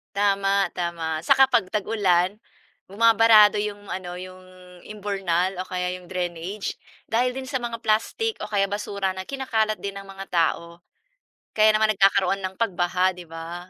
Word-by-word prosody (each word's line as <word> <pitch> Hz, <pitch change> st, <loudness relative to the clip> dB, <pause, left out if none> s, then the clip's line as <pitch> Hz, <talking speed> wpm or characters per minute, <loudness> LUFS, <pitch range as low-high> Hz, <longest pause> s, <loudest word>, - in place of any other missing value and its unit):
Tama, 200 Hz, -1 st, +1 dB
tama, 170 Hz, -3 st, -3 dB
saka 270 Hz, -, +6 dB
'pag 225 Hz, -7 st, +3 dB
tag-ulan, 200 Hz, -2 st, +1 dB, 0.5 s
bumabarado 220 Hz, 0 st, +5 dB
'yong 205 Hz, -1 st, -5 dB
ano, 180 Hz, -1 st, -5 dB
'yong 185 Hz, 0 st, -10 dB, 0.4 s
imburnal 195 Hz, -3 st, -2 dB
o 185 Hz, -, -4 dB
kaya 180 Hz, 0 st, -2 dB
'yong 180 Hz, -1 st, -8 dB
drainage, 180 Hz, +2 st, -4 dB, 0.3 s
dahil 250 Hz, +3 st, +1 dB
din 265 Hz, -, -4 dB
sa 260 Hz, 0 st, -3 dB
mga 235 Hz, -1 st, -6 dB
plastic 315 Hz, -, 0 dB
o -, -, -5 dB
kaya 205 Hz, -2 st, +1 dB
basura 200 Hz, -2 st, -2 dB
na 190 Hz, 0 st, -7 dB
kinakalat 225 Hz, -6 st, -1 dB
din 200 Hz, -1 st, -5 dB
ng 195 Hz, -, -12 dB
mga 195 Hz, 0 st, -9 dB
tao. 170 Hz, 0 st, 0 dB, 0.7 s
Kaya 215 Hz, 0 st, +5 dB
naman 215 Hz, 0 st, +2 dB
nagkakaroon 195 Hz, 0 st, +2 dB
ng 185 Hz, 0 st, -5 dB
pagbaha, 185 Hz, -3 st, +1 dB
'di 175 Hz, -2 st, -12 dB
ba, 170 Hz, +2 st, -8 dB
195 Hz, 155 wpm, -24 LUFS, 180-215 Hz, 0.7 s, saka